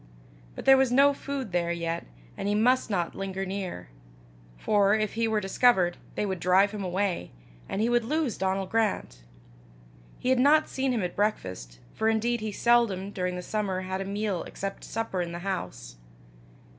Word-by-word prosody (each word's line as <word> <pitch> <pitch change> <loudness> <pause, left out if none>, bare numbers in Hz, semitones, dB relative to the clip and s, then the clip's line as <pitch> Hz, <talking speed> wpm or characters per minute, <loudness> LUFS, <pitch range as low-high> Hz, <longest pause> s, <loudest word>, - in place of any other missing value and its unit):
But - - -8
there 270 0 +8
was 265 -2 +3
no 280 +3 +5
food 275 -6 -5
there 170 -1 0
yet, 170 -1 -3 0.3
and 195 - -4
he 205 - +1
must 245 +3 +3
not 175 -5 -1
linger 195 0 -4
near; 190 - -5 0.7
for, 205 - +3
if 215 -2 -1
he 230 0 0
were 220 -1 +1
discovered, 190 -3 +3 0.2
they - - 0
would 190 -3 -3
drive 185 +3 +4
him 210 -2 -5
away, 185 - -1 0.4
and 200 - -1
he 225 - +2
would 240 0 +2
lose 295 0 -1
Donal 190 0 -1
Grant. 205 - -1 1.0
He 250 - -2
had 260 -1 +4
not 300 +4 +5
seen 265 0 -1
him 230 -5 0
at 180 - -3
breakfast, 90 - -2 0.2
for 220 - +1
indeed 230 +1 0
he 215 -1 -3
seldom, 205 -4 +2
during 180 -2 -2
the 180 - -5
summer, 195 -2 -2
had 190 +1 -3
a - - -3
meal 200 -2 -2
except 195 0 -6
supper 225 -5 -3
in 170 -1 -4
the - - -4
house. - - -5
200 Hz, 180 wpm, -27 LUFS, 185-225 Hz, 1.0 s, there